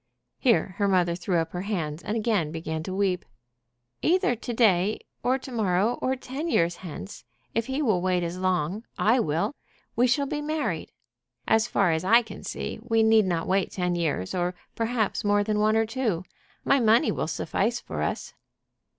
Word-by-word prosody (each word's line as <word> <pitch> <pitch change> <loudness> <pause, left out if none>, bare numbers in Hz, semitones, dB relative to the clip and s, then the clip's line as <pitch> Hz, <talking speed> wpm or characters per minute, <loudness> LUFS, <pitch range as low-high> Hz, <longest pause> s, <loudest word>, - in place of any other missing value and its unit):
Here 230 -7 +2
her 200 - +3
mother 180 -3 +3
threw 175 +1 -1
up 165 0 -1
her 175 - -4
hands 170 -6 -3
and 210 +3 -2
again 210 -9 0
began 160 -1 -4
to 185 +3 -5
weep. 190 -2 +1 0.8
"Either 350 -7 +2
to 240 +2 -6
day 210 -4 +3 0.2
or 255 +2 +2
to 265 0 -10
morrow, 215 0 +1
or 260 +1 +1
ten 265 +5 -5
years 170 - +2
hence, 145 - -8 0.3
if 230 0 -1
he 270 +3 -1
will 210 -9 +2
wait 180 -1 +1
as 170 +2 -4
long, 185 +2 0
I 235 +4 +3
will, 160 - 0 0.4
we 245 +2 +4
shall 280 +3 +2
be 295 +2 -3
married. 305 0 -2 0.6
As 220 +1 +3
far 195 -6 +2
as 160 +1 0
I 230 +6 +5
can 215 -3 -10
see - - -5
we 225 -1 +2
need 220 -1 +5
not 170 -2 0
wait 190 0 +1
ten 180 -1 -1
years, 155 - -1
or 180 0 -1 0.2
perhaps 225 -2 0
more 205 0 +3
than 210 0 0
one 215 +1 +3
or 225 0 +3
two. 220 -7 -1 0.4
My 275 - +4
money 230 +4 +4
will - - -2
suffice - - -1
for - - -5
us." - - -3
205 Hz, 185 wpm, -26 LUFS, 175-235 Hz, 0.8 s, I